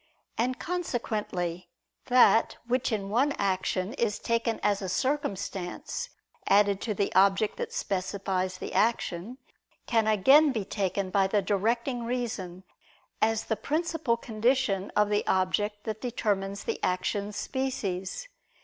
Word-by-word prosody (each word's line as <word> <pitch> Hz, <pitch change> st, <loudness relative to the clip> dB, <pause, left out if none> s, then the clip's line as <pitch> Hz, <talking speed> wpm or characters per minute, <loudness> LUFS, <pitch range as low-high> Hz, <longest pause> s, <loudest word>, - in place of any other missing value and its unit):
And 250 Hz, +3 st, 0 dB
consequently 210 Hz, -, -3 dB, 0.4 s
that 240 Hz, -3 st, +5 dB
which, 250 Hz, +1 st, 0 dB
in 200 Hz, -3 st, -2 dB
one 270 Hz, +6 st, +2 dB
action, 190 Hz, 0 st, -1 dB
is 230 Hz, -6 st, 0 dB
taken 230 Hz, 0 st, -1 dB
as 205 Hz, -1 st, +2 dB
a 190 Hz, -, -3 dB
circumstance 205 Hz, -, -2 dB, 0.4 s
added 200 Hz, -1 st, +4 dB
to 215 Hz, -3 st, -2 dB
the 200 Hz, -, -1 dB
object 195 Hz, +2 st, +3 dB
that 475 Hz, -1 st, -4 dB
specifies 190 Hz, -, -2 dB
the -, -, -6 dB
action, 210 Hz, +1 st, 0 dB, 0.5 s
can 225 Hz, -2 st, +2 dB
again 270 Hz, +9 st, +6 dB
be 220 Hz, -6 st, -2 dB
taken 195 Hz, -1 st, -2 dB
by 195 Hz, -1 st, +3 dB
the 205 Hz, 0 st, +1 dB
directing 235 Hz, +5 st, 0 dB
reason, 220 Hz, -7 st, -3 dB, 0.6 s
as 225 Hz, 0 st, +2 dB
the 220 Hz, -, -1 dB
principal 310 Hz, -3 st, -1 dB
condition 225 Hz, -3 st, 0 dB
of 210 Hz, 0 st, +3 dB
the 205 Hz, -, +2 dB
object 205 Hz, +3 st, 0 dB
that 220 Hz, -1 st, -4 dB
determines 200 Hz, -5 st, -1 dB
the -, -, -4 dB
action's 200 Hz, +3 st, -1 dB
species. 250 Hz, -, -3 dB
210 Hz, 130 wpm, -28 LUFS, 195-245 Hz, 0.6 s, again